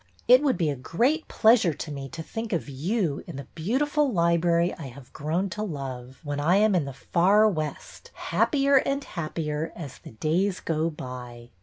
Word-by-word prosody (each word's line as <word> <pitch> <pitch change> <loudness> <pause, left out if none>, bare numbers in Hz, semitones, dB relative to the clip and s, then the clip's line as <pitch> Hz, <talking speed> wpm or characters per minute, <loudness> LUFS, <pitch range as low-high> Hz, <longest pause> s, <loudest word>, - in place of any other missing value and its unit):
It 250 +2 +8
would 280 -4 +2
be 160 -5 +1
a - - -3
great 240 - 0
pleasure 220 -8 +4
to 155 - -6
me 135 -1 -6
to 165 +2 -7
think 225 +4 -5
of 170 - -1
you 155 - -1
in - - -7
the 140 - -6
beautiful 275 - +1
library 170 -1 +2
I 155 - -8
have 130 0 -13
grown 160 +6 -1
to 210 - -4
love, 135 -8 -6
when 145 -1 -3
I 165 +5 +3
am 210 +1 +4
in 170 -6 +2
the 140 - -5
far 190 +10 +3
West, 155 -7 -4
happier 280 -2 +2
and 275 +1 0
happier 155 - -3
as 145 -7 -8
the - - -12
days 175 - 0
go 160 0 -1
by. 125 -5 -9
170 Hz, 185 wpm, -26 LUFS, 145-215 Hz, -, It